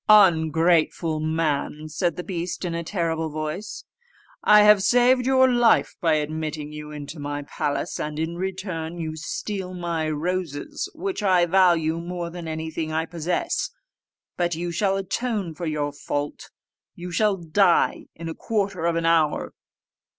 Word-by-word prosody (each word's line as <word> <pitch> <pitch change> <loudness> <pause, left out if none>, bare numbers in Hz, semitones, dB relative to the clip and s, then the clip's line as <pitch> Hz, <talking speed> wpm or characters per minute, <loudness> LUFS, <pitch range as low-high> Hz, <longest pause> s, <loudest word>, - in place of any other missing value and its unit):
"Ungrateful 165 -4 +4
man!" 155 -1 -1
said 170 +2 -1
the 180 - -5
beast 175 0 -4
in 170 - -2
a 170 0 -2
terrible 165 -3 -1
voice, 155 +8 -5 0.6
"I 210 0 +7
have 210 -1 +7
saved 250 +4 +4
your 260 -1 +5
life 240 -2 +3
by 165 -3 +3
admitting 155 0 -3
you 150 0 -8
into 150 +1 -8
my 145 0 -4
palace, 145 0 -3
and 150 0 -4
in 160 +2 -2
return 180 -3 -4
you 160 -2 -4
steal 185 +4 -4
my 170 -3 -2
roses, 160 -1 -3
which 385 - -3
I 185 -3 +4
value 170 -3 +3
more 170 0 -5
than 170 -1 -7
anything 160 0 -4
I 160 +1 0
possess. 170 +1 -2 0.7
But 175 -2 0
you 175 +1 -3
shall 195 +3 +1
atone 195 -2 -2
for 170 +2 -5
your 150 -2 -1
fault: 145 0 -4 0.5
you 180 +1 -7
shall 210 +3 +2
die 175 +2 +2
in 165 0 -7
a 165 - -3
quarter 195 -6 -1
of 170 - +1
an 165 0 0
hour." 165 -2 +2
170 Hz, 150 wpm, -24 LUFS, 155-190 Hz, 0.7 s, I